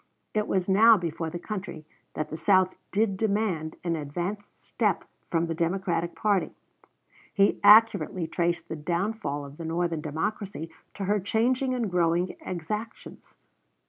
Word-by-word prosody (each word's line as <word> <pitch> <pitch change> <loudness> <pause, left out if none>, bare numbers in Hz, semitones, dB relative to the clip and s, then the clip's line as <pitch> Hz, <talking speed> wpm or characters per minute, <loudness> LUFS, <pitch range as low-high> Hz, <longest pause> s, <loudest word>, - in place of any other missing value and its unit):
It 210 -1 0
was 185 -2 0
now 220 +4 +7
before 165 -2 -3
the 175 - -5
country 185 -4 -6 0.3
that 155 - -3
the - - -5
South 185 +3 +3 0.2
did 200 -1 +1
demand 200 -7 -1
an 170 -1 0
advanced 175 +7 -5
step - - -1 0.3
from 165 0 +1
the 165 - -2
Democratic 170 0 -1
party. 205 -4 0 0.8
He 200 0 +3
accurately 200 -5 +6
traced 170 +1 -1
the - - -4
downfall 170 -1 -2
of 140 +1 -12
the 165 - -6
Northern 165 -1 -1
Democracy 165 +2 -4 0.2
to 200 - -4
her 205 +2 +1
changing 250 +6 +1
and 230 -6 -2
growing 175 +1 +1
exactions. 210 +6 -6
180 Hz, 145 wpm, -27 LUFS, 165-210 Hz, 0.8 s, now